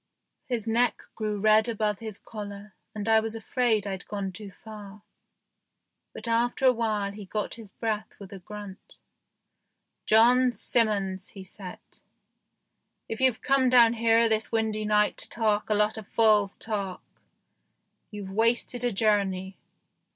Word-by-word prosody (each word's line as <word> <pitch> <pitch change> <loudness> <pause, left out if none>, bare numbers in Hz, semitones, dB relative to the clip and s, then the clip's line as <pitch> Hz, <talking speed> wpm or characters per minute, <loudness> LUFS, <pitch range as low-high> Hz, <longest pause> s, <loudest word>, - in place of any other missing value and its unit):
His 235 -4 -3
neck 235 +2 +1
grew 215 -2 -3
red 215 +2 +4
above 210 -3 -1
his 220 -3 -7
collar, 205 -2 -9 0.2
and 210 0 -4
I 220 0 +5
was 220 0 -4
afraid 225 -1 0
I'd 195 -1 -5
gone 200 -2 -4
too 200 +2 -9
far; 210 0 -12 1.1
but - - -7
after 240 +3 +1
a 260 - +8
while 215 -4 -1
he 205 +1 -9
got 210 +2 -3
his 225 -3 -10
breath 215 0 -4
with 200 -1 -11
a 195 - -8
grunt. 205 0 -10 0.5
" - - -54
John 245 +3 +5
Simmons," 200 -6 0
he 190 - -7
said, 185 -1 -9 0.7
" - - -53
if 225 - -4
you've 260 -3 +3
come 270 -1 +3
down 235 -2 +6
here 230 0 +3
this 220 0 0
windy 220 -1 -1
night 210 0 +2
to - - -2
talk 215 -2 0
a 215 - +2
lot 210 +1 +1
of 210 - -12
fool's 210 -3 +3
talk, 200 -4 -4 1.1
you've 205 -2 -7
wasted 230 +3 +1
a 245 - +1
journey." 195 -3 0
215 Hz, 150 wpm, -27 LUFS, 200-230 Hz, 1.1 s, a